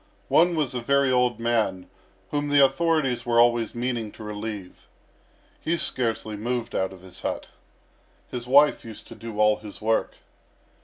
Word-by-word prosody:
One 175 +1 +4
was 150 -6 0
a 125 - -3
very 140 +2 +2
old 125 -1 +2
man, 110 -6 0 0.4
whom 145 0 -1
the 145 - +3
authorities 135 -2 +1
were 120 -1 +2
always 120 -2 +3
meaning 120 -3 -2
to - - -11
relieve. 105 -2 -7 0.7
He 170 +1 0
scarcely 115 -7 -2
moved 120 +2 -3
out 95 0 -1
of 95 -2 -13
his 95 -1 -12
hut. - - -4 0.8
His 125 -1 -6
wife 145 +3 +5
used 110 -2 -10
to - - -10
do 115 -2 -8
all 105 0 +4
his 105 -1 -11
work. 110 +1 0
120 Hz, 160 wpm, -25 LUFS, 105-130 Hz, 0.8 s, wife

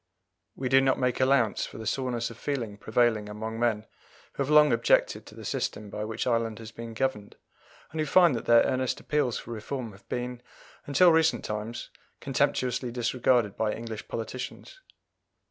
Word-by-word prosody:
We 130 - -3
do 135 +1 +5
not 135 0 +2
make 125 -1 0
allowance 130 -4 +2
for - - -11
the 110 - -7
soreness 120 0 -1
of 115 - -12
feeling 120 -8 -3
prevailing 110 -1 +1
among 110 +2 -5
men 110 -3 +1 0.5
who - - -4
have 140 - -1
long 150 -3 +6
objected 115 - +2
to - - -13
the - - -10
system 105 -1 -3
by 105 0 -4
which 110 +1 -3
Ireland 115 -3 0
has 115 -1 -9
been 115 -1 -8
governed, 110 -5 -2 0.6
and 160 - -5
who 155 - -1
find 175 -2 +5
that 115 - -4
their 115 0 +7
earnest 130 -1 -1
appeals 145 -6 0
for 120 - -8
reform 115 +1 -5
have 100 0 -19
been, 125 0 -4 0.5
until 170 +5 +6
recent 160 0 +2
times, 105 +2 -5 0.3
contemptuously 125 0 0
disregarded 120 -2 +1
by 110 -1 0
English 115 -2 -7
politicians. 130 - -6
120 Hz, 175 wpm, -28 LUFS, 110-130 Hz, 0.6 s, their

